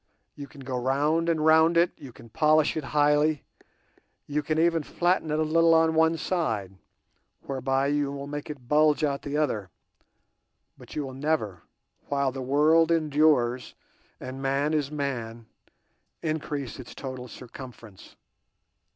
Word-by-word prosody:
You 140 Hz, -1 st, -9 dB
can 140 Hz, -1 st, -14 dB
go 130 Hz, -1 st, -3 dB
round 150 Hz, +6 st, +1 dB
and 160 Hz, -2 st, +1 dB
round 160 Hz, +1 st, +5 dB
it, 170 Hz, +1 st, +4 dB
you 135 Hz, -4 st, -11 dB
can 115 Hz, -, -15 dB
polish 155 Hz, +4 st, +3 dB
it 155 Hz, -3 st, -3 dB
highly, 150 Hz, +1 st, +2 dB, 0.8 s
you 150 Hz, +1 st, -1 dB
can 155 Hz, +1 st, -2 dB
even 165 Hz, 0 st, +2 dB
flatten 175 Hz, +2 st, 0 dB
it 150 Hz, -, 0 dB
a 155 Hz, -, +2 dB
little 165 Hz, +1 st, +4 dB
on 160 Hz, 0 st, +3 dB
one 160 Hz, +1 st, +3 dB
side, 115 Hz, -, -2 dB, 0.7 s
whereby 135 Hz, 0 st, -1 dB
you 145 Hz, 0 st, 0 dB
will 140 Hz, 0 st, -6 dB
make 145 Hz, +1 st, -6 dB
it 135 Hz, -5 st, -9 dB
bulge 150 Hz, +1 st, +3 dB
out 140 Hz, -2 st, 0 dB
the 145 Hz, +1 st, -3 dB
other, 110 Hz, -11 st, -1 dB, 1.1 s
but -, -, -13 dB
you 150 Hz, -, -2 dB
will 130 Hz, -, -8 dB
never, 130 Hz, -, -2 dB, 0.5 s
while 140 Hz, -1 st, +1 dB
the 135 Hz, 0 st, -6 dB
world 150 Hz, +5 st, +3 dB
endures 150 Hz, -6 st, +2 dB, 0.4 s
and 130 Hz, +1 st, -7 dB
man 140 Hz, +3 st, 0 dB
is 150 Hz, -3 st, 0 dB
man, 120 Hz, -6 st, -4 dB, 0.8 s
increase 145 Hz, -5 st, -3 dB
its 125 Hz, -, -10 dB
total 130 Hz, -2 st, -7 dB
circumference. 120 Hz, -4 st, -12 dB
145 Hz, 150 wpm, -26 LUFS, 130-155 Hz, 1.1 s, round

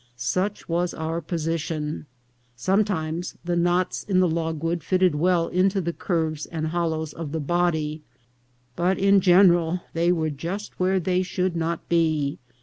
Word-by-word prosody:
Such 185 Hz, +12 st, -2 dB
was 175 Hz, +1 st, -1 dB
our 160 Hz, +1 st, -3 dB
position. 160 Hz, -2 st, -3 dB, 0.5 s
Sometimes 175 Hz, -, -1 dB
the 175 Hz, 0 st, 0 dB
knots 175 Hz, +1 st, +1 dB
in 190 Hz, -3 st, +1 dB
the 185 Hz, -, +4 dB
logwood 165 Hz, 0 st, -1 dB
fitted 185 Hz, 0 st, +2 dB
well 170 Hz, +2 st, +2 dB
into 190 Hz, +2 st, +2 dB
the 170 Hz, -2 st, -2 dB
curves 160 Hz, -5 st, -2 dB
and 160 Hz, -2 st, -3 dB
hollows 160 Hz, -2 st, -2 dB
of 160 Hz, -3 st, -6 dB
the 160 Hz, -, -2 dB
body, 160 Hz, -1 st, 0 dB, 0.7 s
but 180 Hz, +2 st, +1 dB
in 195 Hz, 0 st, +4 dB
general 175 Hz, -2 st, +4 dB
they 170 Hz, +1 st, +2 dB
were 160 Hz, -3 st, 0 dB
just 170 Hz, +9 st, -6 dB
where 185 Hz, +1 st, +2 dB
they 180 Hz, +1 st, +1 dB
should 185 Hz, -1 st, -1 dB
not 165 Hz, 0 st, -2 dB
be. 155 Hz, -4 st, +1 dB
170 Hz, 145 wpm, -24 LUFS, 160-185 Hz, 0.7 s, the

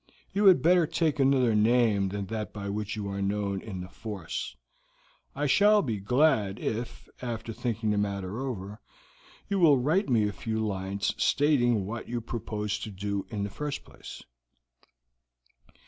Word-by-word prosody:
You 205 Hz, +2 st, +2 dB
had 190 Hz, -2 st, +7 dB
better 175 Hz, 0 st, +5 dB
take 160 Hz, -2 st, 0 dB
another 130 Hz, -4 st, +4 dB
name 105 Hz, -2 st, +3 dB
than 100 Hz, 0 st, -4 dB
that 110 Hz, +2 st, -4 dB
by 100 Hz, -1 st, -5 dB
which 105 Hz, +1 st, -3 dB
you 105 Hz, -2 st, -4 dB
are 100 Hz, 0 st, -3 dB
known 100 Hz, 0 st, -1 dB
in 95 Hz, -5 st, -6 dB
the 90 Hz, -, -7 dB
force. 100 Hz, -4 st, -6 dB, 0.8 s
I 145 Hz, +2 st, -1 dB
shall 205 Hz, +7 st, +5 dB
be 115 Hz, -8 st, -2 dB
glad 110 Hz, -2 st, +2 dB
if, 115 Hz, +2 st, -4 dB
after 115 Hz, -2 st, -4 dB
thinking 115 Hz, -2 st, -1 dB
the 105 Hz, -, +1 dB
matter 100 Hz, +1 st, -2 dB
over, 110 Hz, -5 st, -5 dB, 0.7 s
you 200 Hz, -1 st, 0 dB
will 155 Hz, -6 st, +6 dB
write 155 Hz, +10 st, +1 dB
me 110 Hz, -4 st, +3 dB
a 105 Hz, -, -3 dB
few 110 Hz, +3 st, -3 dB
lines 95 Hz, -1 st, -2 dB
stating 120 Hz, -8 st, +3 dB
what 110 Hz, +3 st, -6 dB
you 120 Hz, 0 st, -2 dB
propose 105 Hz, -3 st, -3 dB
to 110 Hz, -, -6 dB
do 100 Hz, 0 st, -3 dB
in 105 Hz, -3 st, -3 dB
the 100 Hz, -, -4 dB
first 150 Hz, +3 st, -4 dB
place." -, -, -11 dB
110 Hz, 165 wpm, -28 LUFS, 100-130 Hz, 0.8 s, had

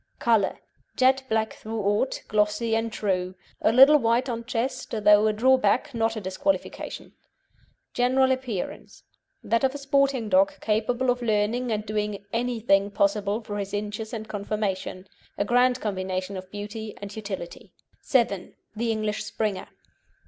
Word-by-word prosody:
COLOUR 225 Hz, -5 st, +2 dB, 0.4 s
Jet 265 Hz, 0 st, +4 dB
black 220 Hz, 0 st, 0 dB
throughout, 215 Hz, +2 st, -1 dB
glossy 210 Hz, +2 st, +1 dB
and 225 Hz, 0 st, -1 dB
true. 185 Hz, -3 st, -1 dB, 0.3 s
A -, -, +4 dB
little 270 Hz, +5 st, +8 dB
white 235 Hz, +2 st, +1 dB
on 230 Hz, -1 st, -3 dB
chest, 255 Hz, +2 st, -2 dB
though 210 Hz, -1 st, +4 dB
a -, -, +3 dB
drawback, 250 Hz, +2 st, +2 dB
not 225 Hz, -1 st, 0 dB
a -, -, -3 dB
disqualification. 190 Hz, +9 st, -3 dB, 0.8 s
GENERAL 260 Hz, +2 st, +3 dB
APPEARANCE 255 Hz, -7 st, -4 dB, 0.4 s
That 230 Hz, +2 st, +1 dB
of 265 Hz, +1 st, +2 dB
a -, -, -2 dB
sporting 275 Hz, -4 st, +1 dB
dog, 195 Hz, 0 st, +3 dB
capable 235 Hz, +4 st, +1 dB
of 245 Hz, 0 st, -3 dB
learning 230 Hz, +2 st, 0 dB
and 215 Hz, -1 st, -2 dB
doing 210 Hz, -1 st, -3 dB
anything 225 Hz, -4 st, +1 dB
possible 200 Hz, +2 st, 0 dB
for 205 Hz, -2 st, -5 dB
his 200 Hz, 0 st, -4 dB
inches 210 Hz, +1 st, -4 dB
and 220 Hz, -2 st, -5 dB
conformation. 200 Hz, -3 st, -3 dB, 0.3 s
A 200 Hz, -, 0 dB
grand 250 Hz, +2 st, +3 dB
combination 185 Hz, -2 st, -3 dB
of 185 Hz, 0 st, -7 dB
beauty 210 Hz, +2 st, -7 dB
and 200 Hz, 0 st, -8 dB
utility. 200 Hz, -5 st, -7 dB, 0.4 s
VII. 225 Hz, -8 st, +1 dB, 0.2 s
THE 230 Hz, +1 st, 0 dB
ENGLISH 215 Hz, -1 st, -2 dB
SPRINGER. 215 Hz, -2 st, -3 dB
220 Hz, 140 wpm, -25 LUFS, 205-245 Hz, 0.8 s, little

